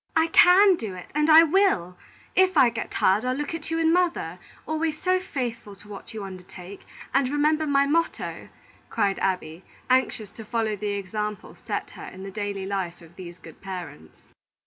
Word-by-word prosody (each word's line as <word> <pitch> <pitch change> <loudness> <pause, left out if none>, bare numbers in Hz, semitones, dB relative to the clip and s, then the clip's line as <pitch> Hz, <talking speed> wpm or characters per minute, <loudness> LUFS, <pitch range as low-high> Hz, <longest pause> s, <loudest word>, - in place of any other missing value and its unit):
"I 325 0 +3
can 365 +3 +6
do 210 - -6
it, 180 - -11
and 300 +2 +1
I 320 +1 +9
will! 320 - +2 0.4
If 375 -2 +3
I 250 -4 +6
get 225 -1 -5
tired, 195 +4 +2
I'll 255 0 -1
look 295 +3 -4
at 320 -2 -6
you 325 - -1
and 325 0 +3
mother, 340 - 0 0.3
always 315 0 -2
so 370 0 +1
faithful 240 - -5
to 200 - -17
what 205 +1 -10
you 220 -3 -6
undertake, 185 0 -11 0.3
and 270 -1 +2
remember 305 +2 +1
my 280 -1 +3
motto," 330 +4 -2 0.4
cried 200 -3 0
Abby, 180 -3 -2 0.3
anxious 230 -5 +1
to 225 - -10
follow 220 -1 -1
the 205 0 -3
example 210 +2 -5
set - - -5
her - - -10
in 190 +1 -10
the 195 - -7
daily 200 -1 -4
life 190 -3 -3
of 165 +1 -17
these 175 -2 -10
good - - -15
parents. 180 - -9
225 Hz, 185 wpm, -25 LUFS, 195-310 Hz, 0.4 s, I